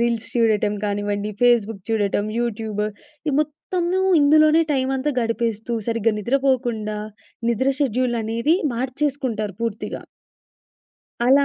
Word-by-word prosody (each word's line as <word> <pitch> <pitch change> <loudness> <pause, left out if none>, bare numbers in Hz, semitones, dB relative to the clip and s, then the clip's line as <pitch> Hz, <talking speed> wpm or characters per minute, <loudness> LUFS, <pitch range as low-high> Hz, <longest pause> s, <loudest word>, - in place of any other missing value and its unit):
Reels 235 -1 0
చూడటం 215 -3 +2
కానివ్వండి, 205 0 -1
Facebook 225 -4 +3
చూడటం, 205 -1 +1
యూట్యూబు. 220 -3 -2 0.4
ఈ - - +3
మొత్తము 345 +4 -1 0.2
ఇందులోనే 310 +2 +5
టైమంతా 265 +1 0
గడిపేస్తూ 230 0 -1
సరిగ్గా 230 -1 +1
నిద్రపోకుండా, 240 -3 0 0.5
నిద్ర 260 +4 +2
షెడ్యూలనేది 240 0 +1 0.2
మార్చేసుకుంటారు 255 -5 -2
పూర్తిగా. 225 -1 -4 1.2
అలా 275 +2 +6
235 Hz, 95 wpm, -22 LUFS, 215-270 Hz, 1.2 s, అలా